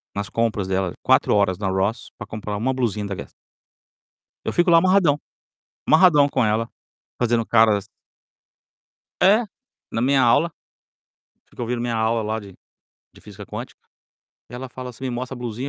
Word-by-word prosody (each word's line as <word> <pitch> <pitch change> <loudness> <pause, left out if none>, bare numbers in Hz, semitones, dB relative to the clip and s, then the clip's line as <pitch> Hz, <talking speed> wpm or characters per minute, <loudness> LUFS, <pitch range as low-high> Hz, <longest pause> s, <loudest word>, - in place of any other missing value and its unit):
nas 100 0 -3
compras 110 -4 -1
dela 95 -2 -1
4 - - +3
horas 95 -3 +2
na 100 - -2
Ross 95 +4 -1
para - - -8
comprar 105 -1 -5
1 130 +5 0
blusinha 110 -5 -1
da 100 - -4
Guess. - - -9 1.1
Eu - - -2
fico 175 +1 +2
lá 170 - +7
amarradão, 180 -5 +3 0.7
amarradão 155 -3 +5
com 125 - +1
ela, 110 +1 0 0.5
fazendo 120 -2 +1
caras 110 -3 +3 1.3
É, 210 +5 +5 0.5
na 115 - -2
minha 135 +2 +3
aula, 145 +7 +3 1.0
fico 120 - -7
ouvindo 120 0 -2
minha 120 -1 -2
aula 110 +1 +1
lá 110 +1 -2
de 100 -3 -12 0.6
de - - -18
física - - -11
quântica - - -8 0.7
e - - -9
ela 130 +1 -7
fala 130 -1 -7
assim 125 +2 -9
me 130 - -2
mostra 125 +2 -4
a - - -10
blusinha 120 +2 -5
115 Hz, 165 wpm, -22 LUFS, 105-130 Hz, 1.3 s, lá